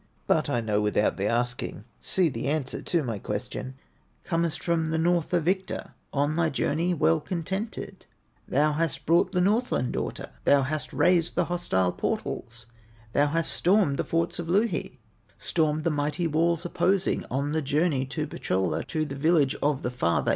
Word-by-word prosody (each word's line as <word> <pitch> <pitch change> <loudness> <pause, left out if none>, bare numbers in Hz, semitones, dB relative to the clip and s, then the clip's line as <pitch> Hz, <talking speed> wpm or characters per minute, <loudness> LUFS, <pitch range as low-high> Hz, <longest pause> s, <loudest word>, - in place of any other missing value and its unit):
"But - - +2
I 120 - +1
know 105 -2 0
without 105 0 +1
the 100 +1 0
asking, 120 -2 -2
See 185 -2 +1
the 125 -3 -3
answer 145 -2 -1
to 170 -3 0
my 115 -5 -3
question: 105 +6 -5 0.5
Comest 170 -2 -1
from 165 -2 +1
the 160 0 0
North 170 0 +1
a 175 - +3
victor, 185 +4 -2 0.2
On 145 +2 +1
thy 165 0 +2
journey 160 +5 0
well 80 - +3
contented; 190 +5 -5 0.4
Thou 150 +3 +3
hast 160 0 -1
brought 170 +3 +3
the 180 - +1
Northland 205 - +1
daughter, - - -4
Thou 140 -1 +5
hast 155 +3 -3
razed 175 -2 +2
the 175 - +2
hostile 145 - 0
portals, 115 +5 -4 0.5
Thou 145 +1 +4
hast 165 +2 0
stormed 180 -6 +3
the - - 0
forts 165 +1 -1
of 170 -1 -4
Louhi, 190 - 0 0.4
Stormed 155 -2 0
the 170 - +1
mighty 150 +4 -1
walls 165 +2 +1
opposing, 190 +2 +1
On 140 +3 -1
thy 160 +1 0
journey 145 -1 +1
to 150 +3 -3
Pohyola, 95 - -1
To 155 -2 -1
the 145 - -6
village 145 -1 +3
of 145 -2 +1
the 125 - -1
father. 85 -9 +1
155 Hz, 170 wpm, -27 LUFS, 130-170 Hz, 0.5 s, Thou